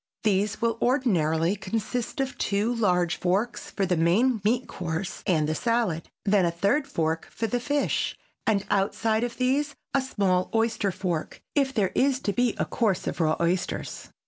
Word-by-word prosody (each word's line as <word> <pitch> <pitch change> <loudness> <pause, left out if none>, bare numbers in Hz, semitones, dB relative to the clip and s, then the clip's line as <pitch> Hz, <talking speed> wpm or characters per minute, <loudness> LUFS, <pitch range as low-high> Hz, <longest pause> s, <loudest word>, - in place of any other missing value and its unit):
These 205 0 +1
will 230 -1 +1
ordinarily 180 - +2
consist 225 +5 -3
of 270 0 -1
two 210 +4 +1
large 180 -7 +1
forks 195 +7 -1
for 195 - -1
the 180 -1 +1
main 205 +9 +3
meat 235 +4 +1
course 175 +1 -4
and 155 -5 +2
the 155 - 0
salad, 230 -5 0 0.2
then 200 -2 +4
a 170 - +3
third 200 - +1
fork 160 - -1
for 230 - -3
the 245 +3 0
fish 285 +3 0 0.3
and 205 -3 +2
outside 220 +3 +1
of 240 -1 -3
these 280 +3 +1 0.2
a 275 - +3
small 190 -8 0
oyster 225 -3 +1
fork 175 -3 -3
if 275 -2 +2
there 205 -7 +1
is 265 -1 +2
to 205 - -1
be 245 0 +1
a - - 0
course 210 -6 0
of - - -3
raw 155 -1 +3
oysters. 175 +2 -2
205 Hz, 170 wpm, -26 LUFS, 180-240 Hz, 0.3 s, then